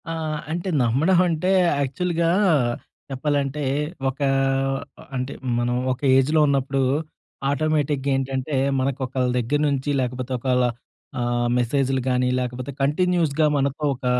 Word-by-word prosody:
ఆ - - -2 0.4
అంటే 175 +3 -2
నమ్మడం 145 +10 +3
అంటే 170 +2 0 0.3
యాక్చువల్‌గా 170 +4 -1 0.8
చెప్పాలంటే 140 +1 -1 0.5
ఒక 135 - -8 1.0
అంటే 130 +1 -3 0.3
మనం 120 0 0 0.2
ఒక 125 - -4 0.2
ఏజ్‌లో 150 +4 +3
ఉన్నప్పుడు 135 -1 +1 0.7
ఆటోమేటిక్‌గా 145 -1 0
ఏంటంటే 135 +2 -2 0.2
మనకు 135 +1 -1
ఒకళ్ళ 130 0 -1
దగ్గర 125 +5 0
నుంచి 140 +1 -1
లేకపోతే 125 +1 -4
ఒకళ్ళ 125 0 +1 0.6
ఆహ్, 120 0 0
మెసేజ్‌లుగానీ 130 0 +1
లేకపోతే 125 +2 -4
కంటిన్యూస్‌గా 160 0 +2
మనతో 140 +2 -1
ఒక 130 +1 -10
135 Hz, 110 wpm, -23 LUFS, 125-150 Hz, 1.0 s, నమ్మడం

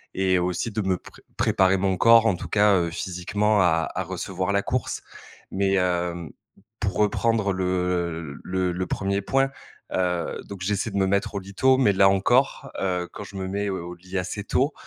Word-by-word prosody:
Et 95 -1 +2
aussi 90 +5 -1
de 110 +1 -2
me 95 -2 0
pr - - -15 0.3
préparer 95 0 +3
mon 95 -1 0
corps 115 +3 +6
en 110 - +3
tout - - -7
cas, 105 -1 +4
heu, 85 -1 0
physiquement, 95 +5 0
à 80 -3 +2
à - - -1
recevoir 95 0 -3
la 100 0 +1
course. 130 -1 -2 0.5
Mais 95 0 +1
hem, 90 -2 -1 0.5
pour 100 -2 -2
reprendre 105 -1 +1
le, 95 - -2
heu, 85 -4 -1
l - - -12
le 90 -1 -1
le 90 +1 -3
1er 100 +1 -1
point, 135 +5 +1 0.4
heu, 90 -2 -1
donc 100 -2 -9
j'essaie 100 +4 -1
de 100 - -3
me 95 - +3
mettre 100 +1 0
au - - 0
lit 100 +1 -11
tôt, 130 +2 +4
mais 105 -7 +4
là 95 0 +5
encore, 125 +7 +2
heu, 90 -2 -1
quand - - -7
je 100 - -12
me 95 - -3
mets, 100 +2 -2
heu, 95 -3 -2
au 90 +1 -7
lit 90 +2 -7
assez 95 +3 -3
tôt, 135 +7 +1
95 Hz, 205 wpm, -24 LUFS, 90-105 Hz, 0.5 s, corps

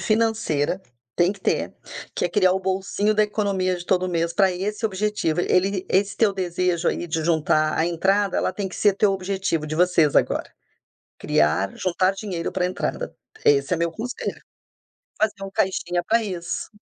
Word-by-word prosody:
financeira, 215 -8 +1 0.4
tem 175 +3 +3
que 200 - -16
ter. - - -1 0.4
Que - - -1
é - - +2
criar 185 0 +3
o 190 - -1
bolsinho 195 +3 0
da 215 - +4
economia 200 -3 0
de 175 - -8
todo 185 0 +1
mês 170 -1 0
pra 195 0 +3
esse 205 +5 -2
objetivo. 195 -5 -1
Ele 190 +1 +1
esse 200 +1 +1
teu 215 -3 +3
desejo, 180 -2 0
aí, 175 - -2
de 160 -1 -2
juntar 155 -1 +2
a 160 - +2
entrada, 195 +3 +1
ela - - 0
tem 200 -2 -3
que - - -9
ser 205 -2 +3
teu 205 -1 +3
objetivo, 190 -4 -2
de 155 - -4
vocês 170 -3 +3
agora. - - +1 0.7
Criar 80 +6 +1
juntar 185 +1 +1
dinheiro 190 -4 -4
pra 180 -1 0
entrada. - - -3 0.3
Esse 140 +4 +4
é - - -1
meu 170 0 0
conselho. 245 +8 -5 0.8
Fazer 215 -2 0
um 195 - -6
caixinha 180 -2 0
pra 230 0 +2
isso. 175 -4 -4
185 Hz, 175 wpm, -23 LUFS, 170-200 Hz, 0.8 s, da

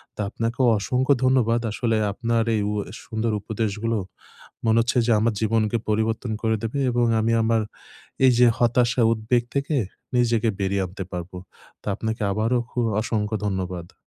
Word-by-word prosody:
তো - - -23
আপনাকেও 115 +4 -1
অসংখ্য 130 +6 +2
ধন্যবাদ। 120 -3 +3
আসলে 115 0 0 0.2
আপনার 115 +1 0
এই 105 - +1
উ - - -2 0.2
এ - - -12
সুন্দর 110 0 -2
উপদেশগুলো 110 +1 -2 0.7
মনে 110 0 +3
হচ্ছে 120 +2 0
যে - - +3
আমার 115 0 +1
জীবনকে 110 +1 +1
পরিবর্তন 110 +2 0
করে 110 -1 +1
দেবে 115 +5 -2
এবং 120 0 +2 0.2
আমি 115 +1 +1
আমার 115 0 +2 0.7
এইযে 125 -1 +5
হতাশা, 120 +1 +2
উদ্বেগ 115 +2 0
থেকে 140 +2 0 0.4
নিজেকে 115 -2 +2
বেরিয়ে 95 0 0
আনতে 95 +2 -7
পারবো। 90 +1 -6 0.4
তো - - -25
আপনাকে 110 0 -3
আবারও 115 +4 +1
খু - - -4 0.2
অসংখ্য 110 -1 -1
ধন্যবাদ। 90 -3 -4
115 Hz, 155 wpm, -24 LUFS, 105-120 Hz, 0.7 s, এইযে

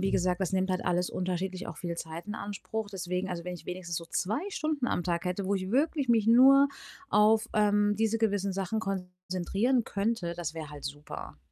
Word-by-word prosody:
wie 195 +1 +1
gesagt, 180 +1 +1
das 190 - -1
nimmt 190 0 +1
halt 185 - 0
alles 180 0 +1
unterschiedlich 185 +1 -2
auch 165 - -7
viel 170 +2 -4
Zeit 165 +2 -6
in 210 - -4
Anspruch. 205 +1 -4
Deswegen 180 0 -3
also, 170 -2 -4
wenn 180 - -4
ich 175 - -12
wenigstens 180 -2 -4
so 170 - -4
2 210 - -1
Stunden 310 -8 -1
am 175 - 0
Tag 170 0 -1
hätte, 180 +2 -1
wo 200 +2 +1
ich 185 0 -2
wirklich 285 +1 +1
mich 225 -3 +4
nur 270 +4 +8 0.4
auf, 215 +1 +5
ähm, 205 -1 +3
diese 225 0 +2
gewissen 200 -3 +1
Sachen 195 +3 -1
konzentrieren 190 +5 -1
könnte, 200 -4 -1
das 165 -2 -4
wäre 155 -2 -6
halt 145 -1 -10
super. 145 +2 -7
190 Hz, 205 wpm, -30 LUFS, 180-220 Hz, 0.4 s, nur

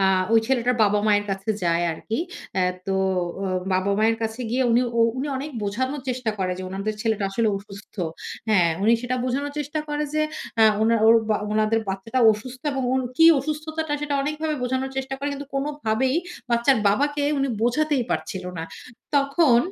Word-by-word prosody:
আ - - +3 0.3
ওই 225 - +7
ছেলেটার 250 -1 +1
বাবা-মায়ের 205 0 +3
কাছে 195 +2 -2
যায় 170 0 +2
আরকি। 220 +7 -4 0.4
আ - - +3 0.3
তো 195 - 0 0.5
আ - - -1 0.3
বাবা-মায়ের 200 +4 +2
কাছে 220 +2 -3
গিয়ে 255 +3 +1
উনি, 235 +1 +4 0.2
ও - - +5 0.2
উনি 265 +3 -2
অনেক 280 +3 -5
বোঝানোর 260 +8 -2
চেষ্টা 250 -3 -1
করে, 185 -1 0
যে - - -5
উনাদের 195 +3 -3
ছেলেটা 220 -3 0
আসলে 225 +3 +1
অসুস্থ 200 +1 -13 0.5
হ্যাঁ, 180 -6 +4
উনি 220 +3 +5
সেটা 255 +1 -1
বোঝানোর 280 +3 -2
চেষ্টা 295 +1 -3
করে, 295 0 -1
যে 310 - +2 0.4
আ - - +8 0.2
ওনা 230 +1 +4
ওর 225 - +8 0.2
বা 215 - +3 0.2
ওনাদের 215 +1 +2
বাচ্চাটা 195 +6 -2
অসুস্থ 250 +4 -8
এবং 270 -1 -2
ওর 260 0 +1
কি 325 - +6 0.2
অসুস্থতাটা? 310 +2 -3
সেটা 295 -1 -2
অনেকভাবে 305 +2 -2
বোঝানোর 260 +2 -1
চেষ্টা 265 0 -2
করে, 285 +1 -2
কিন্তু 280 0 -6
কোনভাবেই 270 -3 0 0.4
বাচ্চার 235 +3 +4
বাবাকে 290 +8 +1 0.2
উনি 275 0 +1
বোঝাতেই 275 +2 +1
পারছিল 190 -4 -3
না। 165 - -3 0.5
তখন 280 -2 +4
245 Hz, 175 wpm, -24 LUFS, 215-280 Hz, 0.5 s, আ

